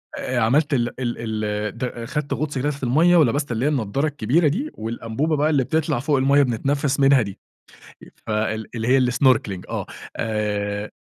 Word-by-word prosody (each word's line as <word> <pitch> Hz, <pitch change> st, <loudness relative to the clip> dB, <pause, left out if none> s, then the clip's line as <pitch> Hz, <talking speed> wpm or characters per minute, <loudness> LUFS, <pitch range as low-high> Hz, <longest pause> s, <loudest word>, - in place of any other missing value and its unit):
آآ، 130 Hz, -, -3 dB
عملت 140 Hz, +7 st, +2 dB
ال 120 Hz, -2 st, +1 dB
ال 115 Hz, -3 st, -3 dB
ال 105 Hz, +1 st, -3 dB
د 120 Hz, -2 st, -4 dB
خَدت 145 Hz, +3 st, -3 dB
غُطس 145 Hz, -2 st, -3 dB
هناك 145 Hz, +3 st, 0 dB
في 140 Hz, -1 st, -9 dB
المَيَّة 160 Hz, +8 st, +4 dB
ولبَست 145 Hz, -3 st, +2 dB
اللي 120 Hz, +3 st, -1 dB
هي -, -, +3 dB
النضّارة 135 Hz, +1 st, 0 dB
الكبيرة 150 Hz, +3 st, +1 dB
دي 240 Hz, -, -1 dB
والأنبوبة 115 Hz, +7 st, -2 dB
بقى 150 Hz, +2 st, +2 dB
اللي 140 Hz, -4 st, +2 dB
بتطلَع 150 Hz, -1 st, 0 dB
فوق 140 Hz, +3 st, +1 dB
المَيَّة 140 Hz, +2 st, +4 dB
بنتنفِّس 140 Hz, +4 st, 0 dB
منها 135 Hz, -1 st, +5 dB
دي، 100 Hz, -3 st, -6 dB, 0.9 s
ف -, -, -10 dB
ال 110 Hz, 0 st, -1 dB
اللي 115 Hz, 0 st, -3 dB
هي 135 Hz, +2 st, +5 dB
الsnorkeling 125 Hz, -8 st, +2 dB
آه، -, -, -3 dB, 0.3 s
آآ 105 Hz, -1 st, -2 dB
130 Hz, 180 wpm, -22 LUFS, 110-145 Hz, 0.9 s, منها